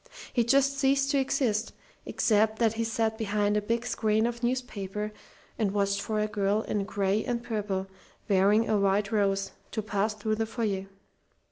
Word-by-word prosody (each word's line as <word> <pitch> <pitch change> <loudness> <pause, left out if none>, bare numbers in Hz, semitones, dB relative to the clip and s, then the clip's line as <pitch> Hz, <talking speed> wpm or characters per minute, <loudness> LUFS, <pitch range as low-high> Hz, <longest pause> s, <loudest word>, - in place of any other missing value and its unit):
"He 240 - +3
just 275 +3 +3
ceased 275 0 +2
to 280 - +3
exist, 235 -5 0 0.3
except 220 0 +2
that 225 -1 +2
he 230 0 -1
sat 225 0 -1
behind 210 -1 +1
a 210 - +2
big 230 +3 -1
screen 220 0 +1
of 235 0 -3
newspaper 210 -5 -3 0.5
and 205 -3 +1
watched 200 -1 +1
for 215 0 -2
a 210 - +2
girl 210 0 0
in 205 -2 -2
gray 200 +1 0
and 240 -2 -2
purple, 205 -4 -2 0.4
wearing 205 +3 +4
a 215 - +2
white 200 +1 +1
rose, 195 -2 +1 0.2
to 220 - -3
pass 210 +1 -1
through 215 +1 -1
the 225 0 -1
foyer. 210 -4 -2
215 Hz, 170 wpm, -28 LUFS, 200-230 Hz, 0.5 s, wearing